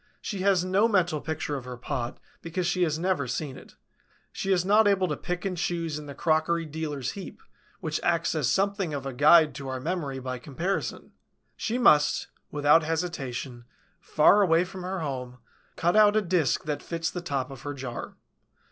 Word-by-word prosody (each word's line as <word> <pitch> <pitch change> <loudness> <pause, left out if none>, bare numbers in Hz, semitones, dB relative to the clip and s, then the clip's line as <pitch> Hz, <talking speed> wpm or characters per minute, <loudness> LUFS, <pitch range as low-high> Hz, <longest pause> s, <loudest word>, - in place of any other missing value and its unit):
She 200 - -5
has 185 -2 +2
no 195 +4 +3
mental 180 -8 +1
picture 160 -2 -3
of 130 - -8
her 125 -1 -7
pot, 125 -1 -4 0.2
because 170 +2 -3
she 175 +1 0
has 155 -3 +2
never 170 -6 0
seen 130 +2 -3
it; - - -14 0.6
she 195 - -3
is 180 -1 +2
not 210 +2 +5
able 195 -2 +3
to 150 - -2
pick 180 +4 -4
and 190 -2 -1
choose 165 -3 -2
in 150 - -10
the 140 - -8
crockery 165 +2 +1
dealer's 150 -4 -4
heap, 195 -2 -9 0.4
which 155 -3 -2
acts 170 -1 +1
as 150 -6 0
something 195 -3 0
of 140 -1 -5
a 135 - -4
guide 155 +4 +6
to 140 -2 -7
our 130 0 -3
memory 150 -2 -3
by 130 -1 -5
comparison; 170 +9 -3 0.4
she 230 +2 -2
must, 150 -11 +4 0.2
without 145 +2 +4
hesitation, 140 -7 -4 0.3
far 180 +7 +4
away 170 -3 +4
from 185 0 -9
her 185 0 -3
home, 125 -4 -5 0.4
cut 175 +3 +1
out 210 -1 +6
a 215 - +4
disk 170 -7 +1
that 150 -1 -3
fits 165 -1 -3
the 180 - -5
top 140 -5 -3
of 135 -3 -10
her 145 +1 -5
jar. 125 -3 -6
160 Hz, 190 wpm, -27 LUFS, 140-180 Hz, 0.6 s, guide